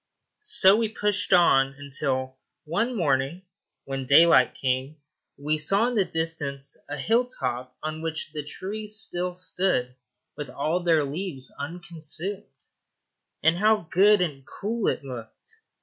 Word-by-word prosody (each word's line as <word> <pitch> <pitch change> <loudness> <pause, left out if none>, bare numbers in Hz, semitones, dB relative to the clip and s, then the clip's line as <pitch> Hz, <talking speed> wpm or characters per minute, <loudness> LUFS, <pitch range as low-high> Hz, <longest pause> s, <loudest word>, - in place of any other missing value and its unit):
So 320 - +5
we 225 -1 0
pushed 205 -2 -1
on, 135 -7 +5
until 130 -2 -2 0.3
one 210 +11 -1
morning, 145 -1 0 0.4
when 135 -1 -4
daylight 160 -1 +6
came, 130 +2 -1 0.4
we 150 +2 -1
saw 200 +9 +2
in - - -4
the 210 -4 +3
distance 160 -5 -3
a 145 - -4
hill 230 - +2
top 125 - -4
on 155 0 -4
which 160 -1 -4
the 150 - -3
trees 210 +8 -4
still 180 -2 -2
stood 180 -8 0 0.4
with 150 - -6
all 155 +5 -1
their 165 -4 +2
leaves 145 -2 -5
unconsumed. 170 +1 -5 0.8
And 160 +2 +4
how 210 -4 +3
good 205 +2 +5
and 145 -6 -2
cool 220 - -3
it - - 0
looked! 130 - -10
165 Hz, 135 wpm, -26 LUFS, 140-195 Hz, 0.8 s, daylight